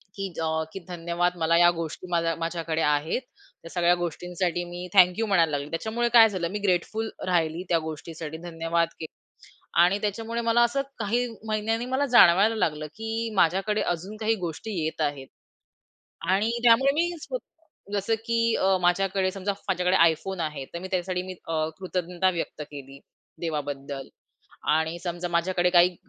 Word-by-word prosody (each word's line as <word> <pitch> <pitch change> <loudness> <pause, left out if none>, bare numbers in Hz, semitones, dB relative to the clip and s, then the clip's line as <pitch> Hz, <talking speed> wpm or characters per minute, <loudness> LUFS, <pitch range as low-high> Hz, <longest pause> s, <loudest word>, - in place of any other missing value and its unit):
की 195 -1 -3
अ, 160 0 0
की - - -5
धन्यवाद 175 0 -1
मला 165 0 +2
या 175 0 +7
गोष्टी 165 +1 -6
माझ्या 165 -1 +1
माझ्याकडे 165 -1 -2
आहेत. 150 - +1 0.4
त्या 165 - -10
सगळ्या 175 0 +3
गोष्टींसाठी 175 +1 -2
मी 175 +1 -7
थँक 180 0 +6
यू 225 - +1
म्हणायला 170 -6 +3
लागली. 145 0 -3
त्याच्यामुळे 225 +8 -1
काय 225 -2 +9
झालं 185 -4 -2
मी 210 - -3
ग्रेटफुल 205 +4 0 0.2
राहिली 170 -1 +1
त्या 170 - +3
गोष्टीसाठी, 160 0 -7
धन्यवाद 170 0 0
के 160 - -4 0.8
आणि 180 +3 +3
त्याच्यामुळे 225 +3 -2
मला 230 +1 +3
असं 240 +4 +1 0.2
काही 235 +3 0 0.2
महिन्यांनी 220 +2 -1
मला 260 +3 0
जाणवायला 220 -4 +6
लागलं, 155 -7 -1
की 225 +7 -4
माझ्याकडे 195 +5 +2
अजून 180 +5 -3
काही 225 +1 +1
गोष्टी 170 +7 -5
येत 160 0 -3
आहेत 145 -3 -2 1.0
आणि 205 +4 +2
त्यामुळे 245 +4 +6
मी 340 +3 +2
स्वतः 325 - -10
जसं 200 +3 +1
की 230 -1 +2
अ, 190 0 +3
माझ्याकडे 185 +1 +2
समजा 195 +1 -2
माझ्याकडे 180 -1 +2 0.2
iPhone 180 +3 -5
आहे, 150 -4 -4
तर 170 - -8
मी 185 - -6
त्याच्यासाठी 180 0 -1
मी 185 0 -6
अ, 155 -1 0
कृतज्ञता 180 0 -1
व्यक्त 165 -2 -4
केली, 140 -1 -10 0.4
देवाबद्दल. 145 -4 -4 0.7
आणि 160 +2 0
समजा 175 0 -3
माझ्याकडे 175 +1 +1
काही 175 0 +5
180 Hz, 160 wpm, -26 LUFS, 165-210 Hz, 1.0 s, काय